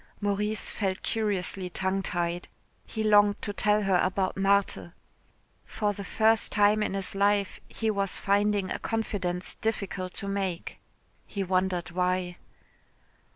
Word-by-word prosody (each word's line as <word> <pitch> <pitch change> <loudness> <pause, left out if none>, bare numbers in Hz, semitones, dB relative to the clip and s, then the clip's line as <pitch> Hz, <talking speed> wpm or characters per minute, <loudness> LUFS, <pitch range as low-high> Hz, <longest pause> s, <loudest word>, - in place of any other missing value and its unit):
Maurice 210 +1 -1
felt 190 -2 -2
curiously 195 -4 -1
tongue 190 +2 -1
tied. 175 -1 -1 0.4
He 220 - -3
longed 205 -1 +5
to 205 - -3
tell 210 +1 +2
her 190 -2 +3
about 185 +1 0
Marthe. 195 -3 +1 0.7
For 210 -1 -1
the 200 - -7
first 220 +3 +3
time 210 +1 +4
in 205 - -1
his 195 -1 -2
life 200 0 +1
he 225 -1 -1
was 200 -2 0
finding 205 -1 +1
a - - -2
confidence 195 -5 -2
difficult 195 -4 -3
to 200 - -3
make. 195 -3 -3 0.5
He 200 -2 -3
wondered 185 -2 0
why. 180 0 -1
195 Hz, 135 wpm, -28 LUFS, 185-210 Hz, 0.7 s, longed